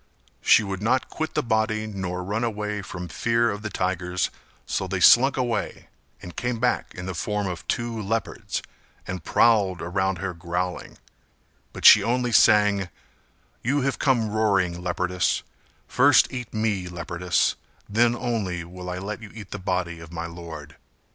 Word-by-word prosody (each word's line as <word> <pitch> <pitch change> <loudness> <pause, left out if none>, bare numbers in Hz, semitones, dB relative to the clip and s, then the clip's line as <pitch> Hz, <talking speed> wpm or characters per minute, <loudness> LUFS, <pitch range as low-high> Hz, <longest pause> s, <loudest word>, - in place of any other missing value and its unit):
She 110 - +5
would 95 -1 -4
not 125 +5 +1
quit 160 0 -4
the - - +1
body 110 -1 0
nor 95 -3 -4
run 105 +5 -2
away 105 -2 -2
from 90 -3 -7
fear 115 +4 +1
of 100 +1 -6
the 105 - -4
tigers, 90 -2 -1 0.3
so - - -2
they - - -2
slunk 135 +3 +6
away 125 -3 -2 0.3
and 90 - -9
came 120 -2 -2
back 125 +1 0
in 90 - -6
the 95 - -4
form 105 +4 -2
of 90 -3 -5
two 120 -2 -2
leopards, 110 +1 -3 0.4
and 90 -3 -5
prowled 100 -5 +3
round 95 +2 -1
her 95 +1 -4
growling; 90 +2 -4 0.7
but - - -7
she 105 - +10
only 120 +3 0
sang 105 -4 +4 0.7
"You 140 +4 +1
have 130 -3 -1
come 120 -6 +2
roaring, 95 -5 +1
leopardess 90 0 0 0.4
First 140 +1 +4
eat 125 -2 -5
me, 110 -4 -1
leopardess 85 +1 0 0.3
Then 120 +3 +3
only 105 -8 -2
will 90 +1 -8
I 90 - -4
let 105 +4 -5
you 110 - -9
eat 105 -4 -10
the - - -5
body 90 -2 -2
of 80 -1 -11
my 85 0 -4
lord." 80 -3 -9
100 Hz, 160 wpm, -24 LUFS, 90-115 Hz, 0.7 s, she